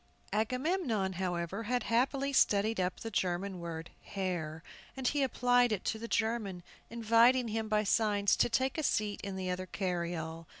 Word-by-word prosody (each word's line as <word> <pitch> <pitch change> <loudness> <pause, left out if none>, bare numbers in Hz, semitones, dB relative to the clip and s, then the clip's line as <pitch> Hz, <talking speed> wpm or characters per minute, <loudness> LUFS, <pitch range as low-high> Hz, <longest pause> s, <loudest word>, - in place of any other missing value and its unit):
Agamemnon, 245 - 0
however, 180 +1 -2
had 250 +2 0
happily 270 +4 +1
studied 215 -3 +3
up 180 0 -1
the 225 - -5
German 185 0 -1
word 165 -1 -6
"Herr," 170 -5 -4 0.3
and 260 -1 -1
he 290 +2 +1
applied 245 -2 +3
it 205 -4 -2
to 220 - -1
the 230 - -5
German, 220 -6 -1 0.3
inviting 235 +2 +4
him 220 0 -2
by 215 0 +2
signs 205 -2 +2
to - - +3
take 260 +5 0
a - - -1
seat 210 -6 0
in 200 -1 -5
the 185 -1 -2
other 185 +1 -4
carryall. 170 -3 -3
210 Hz, 165 wpm, -32 LUFS, 185-235 Hz, 0.3 s, inviting